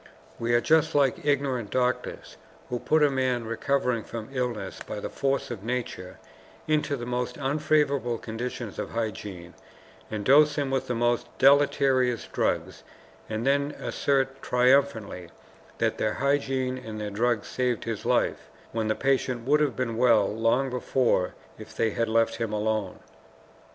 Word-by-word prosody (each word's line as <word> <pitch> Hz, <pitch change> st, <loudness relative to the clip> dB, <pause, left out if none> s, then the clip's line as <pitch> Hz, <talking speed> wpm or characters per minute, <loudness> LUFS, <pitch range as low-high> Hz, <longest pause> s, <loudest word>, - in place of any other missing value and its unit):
We 120 Hz, 0 st, +1 dB
are 120 Hz, -, +4 dB
just 160 Hz, +2 st, +3 dB
like 140 Hz, -4 st, +2 dB
ignorant 135 Hz, -6 st, 0 dB
doctors 125 Hz, +1 st, -2 dB, 0.3 s
who 125 Hz, -, -2 dB
put 155 Hz, +4 st, +2 dB
a 145 Hz, -, +4 dB
man, 130 Hz, -3 st, 0 dB
recovering 125 Hz, 0 st, 0 dB
from 115 Hz, -1 st, -7 dB
illness 120 Hz, -7 st, -3 dB
by -, -, -6 dB
the -, -, -5 dB
force 135 Hz, -2 st, -1 dB
of 105 Hz, -5 st, -6 dB
nature, 115 Hz, -6 st, -4 dB, 0.5 s
into 155 Hz, -1 st, +1 dB
the 120 Hz, -, -6 dB
most 125 Hz, 0 st, -3 dB
unfavorable 140 Hz, -3 st, +1 dB
conditions 115 Hz, 0 st, -5 dB
of -, -, -3 dB
hygiene, 100 Hz, -6 st, -5 dB, 0.6 s
and 105 Hz, -2 st, -4 dB
dose 150 Hz, +3 st, +6 dB
him 140 Hz, -2 st, -1 dB
with 135 Hz, -, -1 dB
the 125 Hz, -, -1 dB
most 120 Hz, 0 st, +1 dB
deleterious 135 Hz, -3 st, +3 dB
drugs, -, -, -1 dB, 0.5 s
and 110 Hz, +2 st, -3 dB
then 140 Hz, +1 st, +2 dB
assert 135 Hz, -1 st, 0 dB
triumphantly 125 Hz, -8 st, +2 dB, 0.5 s
that -, -, 0 dB
their 110 Hz, -, +1 dB
hygiene 135 Hz, -2 st, 0 dB
and 110 Hz, -4 st, -7 dB
their 105 Hz, -1 st, -4 dB
drugs 115 Hz, +1 st, 0 dB
saved 125 Hz, -3 st, -1 dB
his 115 Hz, -3 st, -4 dB
life, -, -, 0 dB, 0.2 s
when 110 Hz, -1 st, -1 dB
the 110 Hz, -, +1 dB
patient 130 Hz, -3 st, 0 dB
would 150 Hz, +3 st, +4 dB
have 145 Hz, -5 st, +1 dB
been 120 Hz, -3 st, -2 dB
well 115 Hz, -4 st, +5 dB
long 115 Hz, +5 st, +1 dB
before 125 Hz, -6 st, +1 dB, 0.2 s
if -, -, -11 dB
they 110 Hz, -, +2 dB
had 115 Hz, +2 st, -1 dB
left 115 Hz, 0 st, +2 dB
him 115 Hz, -2 st, -2 dB
alone. 105 Hz, -2 st, -1 dB
125 Hz, 155 wpm, -27 LUFS, 115-135 Hz, 0.6 s, dose